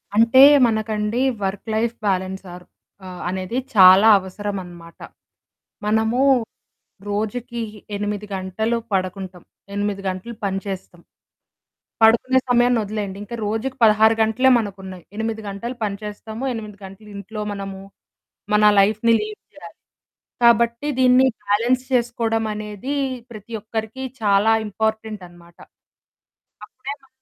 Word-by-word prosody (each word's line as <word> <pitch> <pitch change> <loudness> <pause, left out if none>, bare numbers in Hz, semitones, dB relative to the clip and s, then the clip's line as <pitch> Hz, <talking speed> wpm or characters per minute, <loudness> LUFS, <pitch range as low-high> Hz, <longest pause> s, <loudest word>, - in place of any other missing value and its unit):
అంటే 230 +4 +6 0.3
మనకండి 220 +1 -1 0.2
work 195 +3 -3
life 230 +1 0
balance 190 0 -1
or 180 0 -11 0.4
ఆహ్, 180 -1 -9
అనేది 190 +6 -3 0.2
చాలా 190 +2 +8
అవసరం 200 +2 -5
అన్నమాట. 170 -1 -13 0.9
మనము 220 +4 +1 0.9
రోజుకి 235 +4 -3 0.4
8 205 0 -3
గంటలు 190 +5 -2 0.2
పడకుంటాం. 185 -1 -3 0.3
8 205 -1 -2
గంటలు 190 +6 -5
పనిచేస్తాం. 195 -2 -5 1.0
పడుకునే 235 +4 +5
సమయాన్ని 245 0 +3
వదిలేయండి. 205 -2 -4
ఇంకా 225 +3 -7
రోజుకి 225 +5 -2
16 220 0 +5
గంటలే 225 +4 +3
మనకున్నాయి. 190 -4 -7
8 220 0 -3
గంటలు 230 +6 -6
పని 200 -2 -2
చేస్తాము. 215 +3 -7
8 215 -3 -7
గంటలు 195 +3 -13
ఇంట్లో 210 +2 -7
మనము, 195 -1 -6 0.7
మన 210 0 +4 0.2
లైఫ్‌ని 215 +3 +3
లీడ్ 425 0 -6
చేయాలి. - - -13 0.7
కాబట్టి 235 +3 +3
దీన్ని 255 +1 +5 0.2
బ్యాలెన్స్ 235 +5 +1
చేసుకోవడం 230 -2 0
అనేది 210 +6 -5 0.4
ప్రతి 215 +1 -11
ఒక్కరికి 220 +4 -5 0.2
చాలా 205 +1 +3 0.2
ఇంపార్టెంట్ 220 0 -3
అన్నమాట. 170 0 -19 1.1
అప్పుడే 270 +5 -7
మ 270 - -24
215 Hz, 110 wpm, -21 LUFS, 195-230 Hz, 1.1 s, చాలా